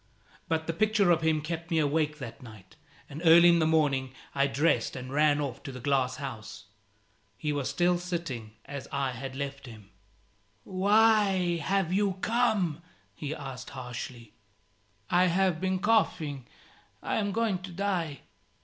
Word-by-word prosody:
But 160 -1 -1
the 165 - -2
picture 210 0 +3
of 165 - +3
him 160 -1 +2
kept 165 +2 -5
me 165 - +1
awake 150 0 +1
that 125 -2 -8
night, 110 -6 -14 0.3
and 150 +3 -8
early 170 +1 +8
in 170 0 +5
the 160 - +2
morning 140 -5 +1 0.2
I 140 0 +2
dressed 145 +4 +1
and 130 0 -7
ran 150 0 +3
off 140 -5 -4
to 135 - -7
the 130 - -8
glass 130 -1 +1
house. 130 -7 -7 0.7
He 150 -1 -2
was 145 -2 -2
still 175 0 +2
sitting 165 -12 -5
as 140 -1 -7
I 140 -2 -1
had 130 +2 -7
left 140 -1 -5
him. 110 -4 -13 0.7
"Why 195 - +3
have 185 0 0
you 200 0 +2
come?" 215 -9 +1 0.3
he 145 +8 -5
asked, 135 -4 -7
harshly. 120 -2 -7 0.8
"I 180 +1 +5
have 180 -1 +1
been 190 0 0
coughing. 165 - +1 0.6
I - - -1
am 205 -2 0
going 220 -3 0
to 185 0 -9
die." 175 -5 -2
155 Hz, 160 wpm, -29 LUFS, 135-180 Hz, 0.8 s, early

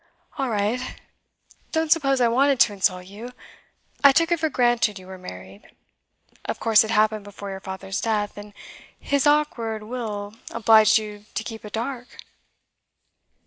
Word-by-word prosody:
'. - - -29
'All 270 -2 0
right. 220 +4 -2 0.7
Don't 320 -1 0
suppose 275 -5 +3
I 245 - +4
wanted 270 +3 +2
to 210 - +5
insult 185 -2 0
you. 215 +6 -10 0.7
I 280 - +9
took 330 +4 +2
it 340 - +2
for 315 0 0
granted 240 -6 +1
you 185 - -12
were 190 0 -10
married. 95 - -11 0.7
Of - - -4
course 225 0 +5
it 220 - -6
happened 215 -1 +2
before 200 0 -8
your 190 - -6
father's 190 0 -5
death, 210 -2 -1
and 205 0 -11 0.4
his 280 +1 +1
awkward 235 -8 +1
will 215 -3 -5 0.2
obliged 220 -1 +5
you 210 -1 -6
to 220 - -2
keep 220 -1 -8
it 210 - -10
dark? 245 +2 -5
220 Hz, 160 wpm, -23 LUFS, 205-250 Hz, 0.7 s, I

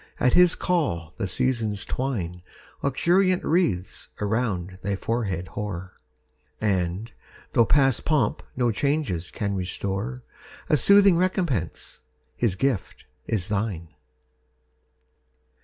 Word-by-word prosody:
at 125 - +3
his 180 -1 +6
call 90 - -1
the 100 - -2
Seasons 110 -1 -1
twine 95 -10 -3 0.4
Luxuriant 180 +7 +2
wreaths 115 - 0
around 100 -4 -1
thy 100 +1 -1
forehead 95 -5 -2
hoar; 95 -3 -5 0.7
And, 95 +1 -1 0.4
though 115 - +4
past 135 -3 +3
pomp 155 -2 +1
no 120 -2 +2
changes 135 - -1
can 100 -3 -2
restore, 100 +7 -3 0.5
A 155 - +5
soothing 200 +1 +6
recompence, 170 - -1 0.4
his 105 - +1
gift, 120 -2 -2 0.2
is 105 -5 -1
thine! 100 -6 -2
110 Hz, 105 wpm, -25 LUFS, 95-140 Hz, 0.7 s, his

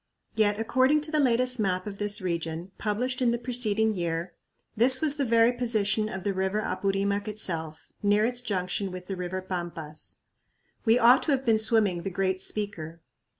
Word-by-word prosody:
Yet 210 -1 +1
according 260 +6 +2
to 305 +1 -9
the 305 - +1
latest 255 -2 +3
map 185 -3 -1
of 200 -1 -7
this 205 +1 +1
region, 170 0 -4
published 250 +5 -2
in 245 - +3
the 235 - +1
preceding 220 -3 +1
year, 170 -1 -3 0.4
this 255 +4 +5
was 295 -1 +1
the 280 - 0
very 230 0 +4
position 215 -4 0
of 190 -3 -6
the 200 0 -1
river 190 +2 -1
Apurimac 200 +1 -1
itself, 165 -7 -2
near 205 +1 +3
its 245 +1 -2
junction 195 -3 -2
with 180 0 -8
the 195 - -5
river 180 +1 -4
Pampas. 170 -4 -6 0.7
We 225 +1 +5
ought 245 +3 +6
to 310 - -1
have 265 0 -2
been 225 -2 +3
swimming 210 -5 +2
"the 195 - -4
Great 190 0 -1
Speaker." 170 -6 -3
205 Hz, 180 wpm, -27 LUFS, 185-235 Hz, 0.7 s, ought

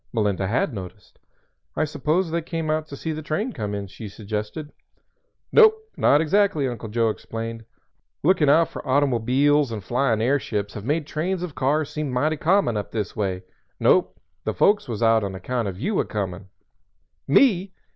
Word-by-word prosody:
Melinda 100 -4 0
had 120 +5 0
noticed. 95 -4 -10 0.6
"I 155 - +1
suppose 155 +4 0
they 170 +1 0
came 165 -1 -3
out 155 0 -1
to 140 - -8
see 160 - -4
the 155 0 -4
train 165 - -2
come 105 -5 -4
in," 100 -1 -4
she 105 +3 -9
suggested. 105 +9 -5 0.8
"Nope; 440 -1 +7 0.2
not 145 - +4
exactly." 175 -3 +2
Uncle 120 -3 -5
Joe 115 +1 +1
explained, 115 +1 -6 0.6
"Looking 155 -3 +4
out 160 +3 +5
for - - -7
automo_biles_ 140 +1 +2
and 105 -3 -5
flying 120 -1 +1
airships 110 -5 -1
have 105 -1 -7
made 150 +3 0
trains 175 +5 -2
of 175 -5 -5
cars 140 +3 0
seem 150 -2 -3
mighty 145 +5 0
common 165 - +2
up 105 - -4
this 105 -4 -3
way. 95 -3 -2 0.4
Nope; - - +3 0.2
the - - -2
folks 205 +1 +3
was 115 -1 -2
out 115 -1 +4
on 95 -1 -4
account 115 +4 -2
of 95 -1 -5
you 200 - 0
a - - +1
comin'." 95 -2 -4 0.8
"Me?" 195 - +4
135 Hz, 175 wpm, -23 LUFS, 110-155 Hz, 0.8 s, Nope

